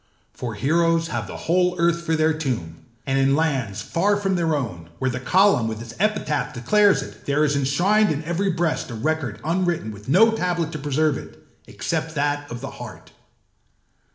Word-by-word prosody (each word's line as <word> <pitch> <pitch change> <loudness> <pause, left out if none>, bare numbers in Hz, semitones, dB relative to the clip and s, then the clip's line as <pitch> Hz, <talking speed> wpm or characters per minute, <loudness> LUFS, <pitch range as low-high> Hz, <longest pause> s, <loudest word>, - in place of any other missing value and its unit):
For 120 -4 -5
heroes 165 +6 +2
have 120 -7 -3
the - - -7
whole 180 +1 +2
earth 170 0 +2
for 165 -1 0
their 155 0 +2
tomb; 120 - -3 0.3
and 135 -1 +1
in 135 0 +3
lands 130 -10 -1
far 200 +4 +1
from 195 -2 0
their 165 -3 +1
own, 90 - -4
where 130 +6 0
the 130 - -4
column 185 - +3
with 110 -1 -4
its 115 0 -9
epitaph 150 -9 0
declares 185 - +3
it, - - -13
there 145 +2 +2
is 145 -1 +1
enshrined 175 +11 +2
in 155 0 -2
every 175 +5 -1
breast 170 -5 -1
a 120 - -6
record 130 -1 -2
unwritten 170 -8 0
with 105 +3 -11
no 220 +10 +6
tablet 175 -6 -1
to 155 - -5
preserve 145 0 +1
it, - - -14 0.2
except 160 0 -3
that 145 0 -1
of 120 0 -6
the 135 +1 -6
heart. 110 -11 -10
150 Hz, 185 wpm, -23 LUFS, 130-170 Hz, 0.3 s, no